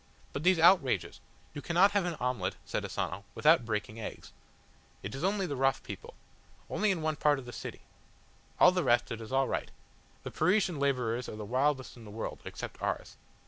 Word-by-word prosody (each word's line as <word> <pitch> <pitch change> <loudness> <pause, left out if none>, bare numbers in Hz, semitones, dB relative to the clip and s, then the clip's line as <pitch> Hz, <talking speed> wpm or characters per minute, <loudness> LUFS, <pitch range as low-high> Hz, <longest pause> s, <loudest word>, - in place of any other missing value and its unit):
"But 140 - -3
these 180 +2 +4
outrages!" 165 -5 +4 0.3
"You 145 - -6
cannot 175 +6 +4
have 205 -3 +1
an 175 -2 -2
omelette," 125 -9 -2
said - - -2
Asano, 95 +4 -3
"without 155 -5 +5
breaking 110 0 -3
eggs. 110 - -8 0.7
It 95 - -5
is 135 - -5
only 195 +1 +1
the 145 -5 -3
rough 135 0 +1
people. - - -9 0.6
Only 215 +1 +1
in 175 -5 0
one 155 -1 0
part 145 -1 +3
of 135 - -8
the 120 - -8
city. - - -7 0.8
All 180 - +8
the 180 -1 0
rest 120 0 +2
is 115 0 -6
all 135 0 +2
right. - - -2 0.5
The - - -6
Parisian 185 -5 +2
labourers 125 -4 0
are - - -6
the 105 -1 -6
wildest 130 +2 0
in 115 - -12
the - - -10
world, 110 +2 -5
except - - -7
ours." - - -3
135 Hz, 190 wpm, -31 LUFS, 115-175 Hz, 0.8 s, All